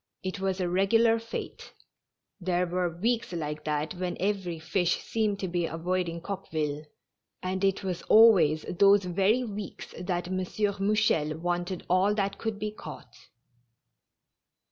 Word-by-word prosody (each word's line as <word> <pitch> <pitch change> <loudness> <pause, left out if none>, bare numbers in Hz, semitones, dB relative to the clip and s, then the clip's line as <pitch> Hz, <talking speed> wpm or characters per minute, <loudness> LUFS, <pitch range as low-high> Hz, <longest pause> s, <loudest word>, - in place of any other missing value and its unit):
It 185 +1 -4
was 190 0 -1
a - - 0
regu 195 +5 +3
lar 230 0 +4
fate; 230 0 -7 0.7
there 180 -1 0
were 180 0 -1
weeks 230 +1 0
like 150 -2 -4
that 150 0 -1
when 180 0 -3
every 190 -3 -1
fish 165 +3 0
seemed 215 -3 0
to 190 - -1
be 175 -1 -1
avoiding 170 +1 -2
Coqueville, 155 -6 -4 0.6
and 185 +1 -2
it 195 0 +1
was 180 -3 -3
always 185 -9 +6
those 200 +2 +5
very 195 +7 +2
weeks 210 -4 -7
that 175 -1 -2
M. 185 - -1
Mouchel 200 -4 +1
wanted 175 +1 -2
all 190 +3 +3
that 200 -1 -1
could 220 -2 -3
be 210 0 -3
caught. 215 - -10
185 Hz, 145 wpm, -28 LUFS, 175-200 Hz, 0.7 s, always